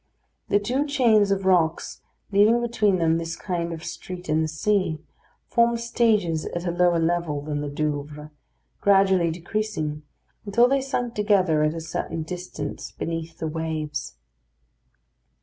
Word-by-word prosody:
The - - +4
two 255 +8 -1
chains 230 -8 +4
of 195 -1 0
rocks, 170 -4 +1 0.3
leaving 210 +4 +5
between 220 -5 +1
them 165 -1 +2
this 165 0 -4
kind 170 -2 -3
of 165 -1 -6
street 180 -2 -7
in 155 +1 +2
the 160 - 0
sea, 165 +1 0 0.5
formed 235 0 +2
stages 215 -9 +1
at 175 +1 -4
a 175 - 0
lower 175 0 +3
level 165 -2 0
than 145 -1 -3
the 145 - -3
Douvres, 150 0 -4 0.5
gradually 190 -3 +4
decreasing, 165 -3 -3 0.4
until 225 +4 +4
they 275 +1 +2
sunk 245 -3 -2
together 195 -7 +2
at 155 +1 +1
a 165 - -4
certain 165 0 -4
distance 180 +2 -6
beneath 165 0 -5
the - - -4
waves. 155 - -4
175 Hz, 145 wpm, -24 LUFS, 160-210 Hz, 0.5 s, leaving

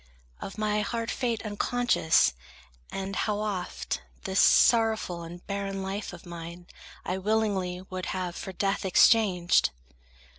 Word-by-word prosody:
Of 195 - -7
my 210 0 +1
hard 230 +2 -2
fate 235 -3 -2
unconscious, 205 - +2 0.6
and 195 0 -4
how 210 +1 0
oft 200 -4 -3 0.2
This 190 0 0
sorrowful 220 -6 +4
and 170 +1 -10
barren 195 -1 -3
life 195 +2 -4
of 175 -1 -12
mine 170 0 -8 0.4
I 185 +1 -2
willingly 195 -3 0
would 185 -1 -5
have 185 -2 -3
for 190 - -6
death 195 +2 -1
exchanged! 190 -2 +4
195 Hz, 125 wpm, -28 LUFS, 180-215 Hz, 0.6 s, sorrowful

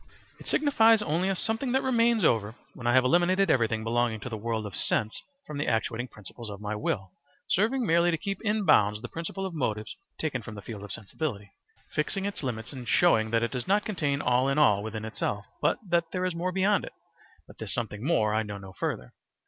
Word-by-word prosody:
It - - -13
signifies 225 -7 +4
only 180 +1 0
a 195 - +1
something 225 +7 -1
that 265 - +2
remains 235 -4 +3
over 110 -3 +2 0.2
when 120 - -5
I 120 - +4
have 130 - +6
eliminated 175 +5 +3
everything 110 -3 +1
belonging 115 0 +1
to 125 - -5
the 115 - -4
world 110 0 -2
of 100 - -6
sense 110 +1 0 0.2
from 150 -2 -6
the - - -1
actuating 115 +2 0
principles 110 +1 -10
of 100 -1 -7
my 105 0 -3
will, 95 -2 -2 0.4
serving 230 +6 +2
merely 170 -1 +4
to 165 - +1
keep 195 +4 -4
in 210 -1 0
bounds 105 - +4
the - - -4
principle 170 +6 -5
of 190 - -4
motives 110 -8 -2 0.2
taken 145 -6 -2
from 110 -1 -9
the 100 - -9
field 105 -2 -7
of 105 - -8
sensibility; 105 - -4 0.4
fixing 195 -1 -1
its 200 - -3
limits 120 -2 -4
and 125 -3 -8
showing 115 -11 +4
that 115 0 +2
it 115 - -1
does 125 +3 -4
not 205 +2 +2
contain 145 -9 -1
all 125 +2 +3
in 135 - 0
all 105 -10 +5
within 110 0 -5
itself, 105 -2 -3 0.2
but - - +2
that 170 -1 +2
there 185 -1 -1
is 185 - 0
more 175 +2 -2
beyond 195 +2 +2
it; - - -8 0.5
but - - -16
this - - -3
something 110 -3 -3
more 110 -9 +2
I 110 - +2
know 105 -2 -5
no 95 -1 -10
further. 60 -8 -4
125 Hz, 220 wpm, -28 LUFS, -, 0.5 s, have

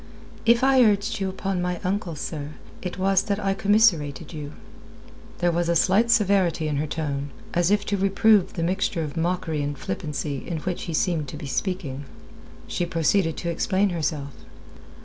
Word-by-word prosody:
"If 235 +2 +5
I 265 -1 +5
urged 205 -1 +2
you 195 -1 -1
upon 190 -1 -2
my 180 -1 -2
uncle, 185 -3 -2
sir, 150 0 -5 0.3
it 180 -1 -5
was 195 0 +3
that 200 0 -2
I 195 -2 0
commiserated 195 - +2
you." 150 -2 -7 0.8
There 175 0 +2
was 170 0 0
a 170 - +2
slight 195 +7 +3
severity 195 -8 +3
in 150 -2 -1
her 155 +2 -1
tone, 145 -2 -3 0.2
as 175 0 +2
if 205 0 +2
to 200 - 0
reprove 195 +1 +3
the 165 - -2
mixture 180 -1 0
of 150 -2 -6
mockery 165 -2 -1
and 145 0 -3
flippancy 150 -5 -4
in 170 - -2
which 180 0 -3
he 165 - -3
seemed 160 -4 0
to 150 - -7
be 150 - -7
speaking. 145 -3 -3 0.6
She - - -2
proceeded 165 0 +1
to 170 - -2
explain 195 +3 +1
herself. 150 -4 -2
175 Hz, 175 wpm, -24 LUFS, 155-195 Hz, 0.8 s, If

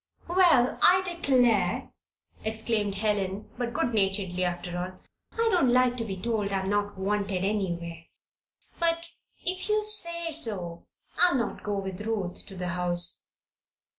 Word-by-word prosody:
"Well, 340 -8 +4
I 370 +1 +6
declare," 245 - +2 0.5
exclaimed 220 -2 -1
Helen, 200 -1 -1
but 240 -1 -3
good 240 0 -1
naturedly 195 -3 0
after 175 0 -3
all. 180 +1 -4 0.4
"I 460 0 +1
don't 335 -9 +3
like 250 0 +3
to 230 - -1
be 195 -4 -5
told 210 0 -1
I'm 190 0 -1
not 205 -1 -1
wanted 195 -1 -1
anywhere. 170 -5 -3 0.7
But 335 0 +1 0.4
if 370 +3 -1
you 425 0 +2
say 340 -6 +1
so, 195 - 0 0.3
I'll 355 -4 +6
not 235 -3 -2
go 205 -1 -2
with 190 0 -5
Ruth 210 -5 -3
to 195 - -9
the 180 -1 -3
house." 175 0 0
210 Hz, 140 wpm, -27 LUFS, 185-255 Hz, 0.7 s, I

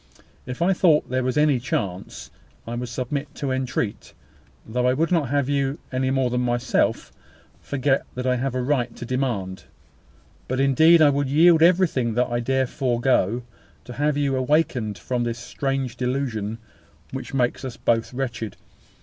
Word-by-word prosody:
If 125 +6 -3
I 190 +2 +3
thought 160 -7 +3
there 130 0 0
was 130 +3 -1
any 150 -4 +3
chance, 100 -7 -4 0.3
I 115 - -5
would 120 0 -4
submit 135 +4 -4
to 140 -2 -3
entreat, 125 -5 -3 0.5
though 125 +3 0
I 125 - +3
would 165 +5 0
not 160 -7 +1
have 140 -1 +1
you, 140 0 0
any 130 0 0
more 130 -2 +1
than 125 0 0
myself, 120 -1 0 0.5
forget 135 -1 0
that 125 0 -4
I 125 -1 +2
have 130 +1 -2
a 130 - -1
right 125 -3 0
to 120 - -7
demand. 115 -8 -2 0.8
But 130 +1 -2
indeed 155 +5 +6
I 145 - +6
would 140 -1 -1
yield 160 +3 +5
everything 165 -10 +3
that 125 0 +1
I 120 - 0
dare 130 +2 +1
forego, 120 -4 0 0.4
to 125 - -8
have 145 +2 0
you 140 -2 +1
awakened 130 -6 0
from 120 +7 -2
this 120 0 -2
strange 130 +1 -3
delusion 125 -4 -2 0.5
which 135 +1 -6
makes 125 +1 0
us 130 -3 -6
both 115 -1 0
wretched. 120 -5 -4
130 Hz, 165 wpm, -23 LUFS, 120-140 Hz, 0.8 s, indeed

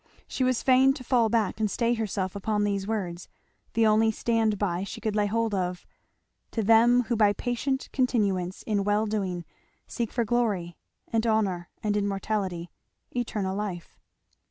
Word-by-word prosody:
She 260 - -2
was 255 -2 +1
fain 265 +1 +5
to 270 -2 -9
fall 240 -3 +3
back 225 -2 0
and 215 -1 +1
stay 235 +3 +1
herself 200 -4 -2
upon 210 +1 0
these 200 -1 -1
words, 185 -6 -3 0.4
the 230 -1 +3
only 220 +1 +4
stand 220 -1 +1
by 185 -2 -1
she 200 - -7
could 220 -2 -2
lay 210 -1 +2
hold 225 +1 0
of; 180 -2 -2 0.7
"To 225 - 0
them 235 +3 +5
who 240 0 -1
by 210 -2 +4
patient 255 +4 -2
continuance 200 -8 0
in 205 -3 0
well 205 +2 +2
doing 190 -5 -2 0.4
seek 235 -3 -3
for 235 -2 0
glory, 205 -7 0 0.4
and 225 0 +2
honour, 195 -6 0
and 210 -1 +1
immortality, 195 -3 -2 0.4
eternal 210 -6 -2
life!" 195 -5 -5
215 Hz, 160 wpm, -27 LUFS, 195-230 Hz, 0.7 s, fain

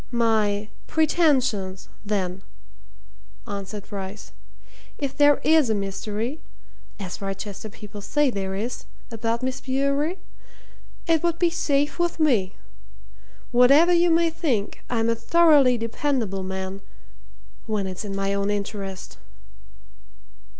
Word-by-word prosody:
"My 215 -3 +1 0.2
pretensions, 260 - +1 0.2
then," 195 -3 -2 1.0
answered 200 0 -6
Bryce. 200 0 -7 0.7
"If 280 -2 -3
there 290 -1 +5
is 310 -5 +4
a 220 - +2
mystery 210 +7 -3 0.6
as 190 -1 -6
Wrychester 200 +2 -5
people 210 0 -10
say 295 +6 +1
there 190 -3 -3
is 230 +5 -4 0.3
about 230 +1 -2
Miss 260 0 -2
Bewery, 280 +6 0 0.9
it 325 -2 +3
would 340 -1 0
be 345 -1 +2
safe 290 -3 0
with 345 -1 0
me. 230 -12 +2 1.0
Whatever 275 +8 +6
you 345 0 +4
may 330 0 +3
think, 260 - -2
I'm 230 -2 +1
a 230 - +3
thoroughly 285 0 +5
dependable 230 -3 -1
man 190 +1 -5 0.9
when 210 -3 -1
it's 185 +1 -5
in 200 -2 -5
my 195 0 -1
own 200 0 0
interest." 200 -2 -4
225 Hz, 115 wpm, -24 LUFS, 200-290 Hz, 1.0 s, Whatever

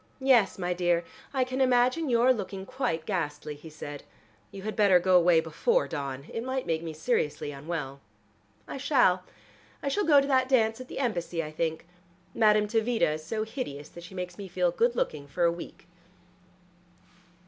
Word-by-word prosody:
"Yes, 255 -7 +4
my 180 -1 -1
dear, 175 -1 +1 0.3
I 265 -2 +1
can 255 +1 -2
imagine 255 +4 +3
your 245 +2 +5
looking 195 -3 -5
quite 255 -11 -2
ghastly," 150 -6 -3
he 150 +2 -12
said. 145 -2 -8 0.5
"You 195 - -9
had 215 +1 -4
better 200 -4 +5
go 185 +1 +3
away 175 -2 +6
before 315 - +1
dawn. 140 -3 -5
It 230 - -3
might 260 0 -2
make 160 -1 -1
me 165 -1 -5
seriously 155 -3 -1
unwell." 140 -1 -5 0.7
"I - - -6
shall. 255 -10 +3 0.6
I 280 - 0
shall 410 +9 0
go 300 -6 +6
to 275 - +1
the 265 -2 +3
dance 225 -3 +2
at 255 - -9
the - - -8
Embassy, 175 -9 -1
I 155 - -7
think. 160 +1 -2 0.5
Madame 210 -2 +4
Tavita 225 -3 +1
is 155 0 -6
so 215 +6 -2
hideous 185 - -6
that 170 - -12
she 175 +2 -11
makes 180 0 -6
me 200 - -6
feel 180 -1 +1
good 235 +7 +1
looking 145 -10 -2
for 175 +5 -2
a 170 - +5
week." 170 0 -9
185 Hz, 180 wpm, -28 LUFS, 160-245 Hz, 0.7 s, away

